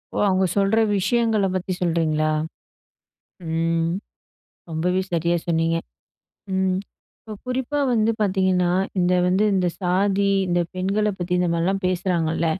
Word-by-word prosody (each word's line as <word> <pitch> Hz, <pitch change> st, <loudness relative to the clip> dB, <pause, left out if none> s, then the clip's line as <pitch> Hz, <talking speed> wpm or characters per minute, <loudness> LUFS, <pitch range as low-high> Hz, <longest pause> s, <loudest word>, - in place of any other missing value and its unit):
ஓ! -, -, -2 dB
அவங்க 190 Hz, 0 st, +2 dB
சொல்லுற 200 Hz, +3 st, +3 dB, 0.2 s
விஷயங்கள 225 Hz, 0 st, +1 dB
பத்தி 185 Hz, 0 st, -3 dB
சொல்றீங்களா? 155 Hz, -3 st, +1 dB, 1.2 s
ம் 165 Hz, 0 st, 0 dB, 0.8 s
ரொம்பவே 180 Hz, +4 st, 0 dB
சரியா 170 Hz, 0 st, +1 dB
சொன்னீங்க. 165 Hz, 0 st, +1 dB, 0.8 s
ம் 190 Hz, -1 st, +1 dB, 0.4 s
இப்போ 220 Hz, -, -10 dB
குறிப்பா 260 Hz, +3 st, -1 dB
வந்து 225 Hz, -1 st, +2 dB
பாத்தீங்கன்னா, 185 Hz, -3 st, +2 dB, 0.3 s
இந்த 180 Hz, 0 st, +3 dB
வந்து 190 Hz, +4 st, +2 dB
இந்த 185 Hz, -2 st, +2 dB
சாதி 195 Hz, +2 st, +1 dB, 0.2 s
இந்த 175 Hz, 0 st, +2 dB
பெண்கள 195 Hz, +3 st, 0 dB
பத்தி 175 Hz, 0 st, -4 dB
இந்த 180 Hz, -, +1 dB
மாரிலாம் 185 Hz, +4 st, 0 dB
பேசுறாங்கல்ல, 170 Hz, -3 st, 0 dB
185 Hz, 120 wpm, -23 LUFS, 170-195 Hz, 1.2 s, சொல்லுற